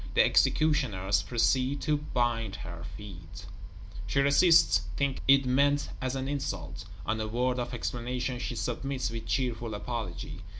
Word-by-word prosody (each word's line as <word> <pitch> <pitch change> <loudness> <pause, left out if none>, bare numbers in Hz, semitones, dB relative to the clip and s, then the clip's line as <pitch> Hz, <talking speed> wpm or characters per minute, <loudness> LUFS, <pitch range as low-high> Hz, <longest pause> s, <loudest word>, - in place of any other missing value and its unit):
The - - +6
executioners 105 -11 +2
proceed 125 +5 +1
to 150 -1 +1
bind 120 -7 -1
her 85 -2 -8
feet; 95 -2 -10 0.6
she 135 - +1
resists, 160 +5 +5 0.2
thinking 140 -1 0
it 135 0 +6
meant 140 +3 +2
as 130 0 -2
an 135 0 -3
insult; 100 - -4 0.2
on 110 +1 -1
a 110 - -2
word 125 +3 0
of 120 0 -3
explanation, 125 +1 -3
she 120 -1 -4
submits 130 +2 -2
with 115 -1 -6
cheerful 120 -4 -1
apology. 105 -3 -5
125 Hz, 140 wpm, -29 LUFS, 110-135 Hz, 0.6 s, The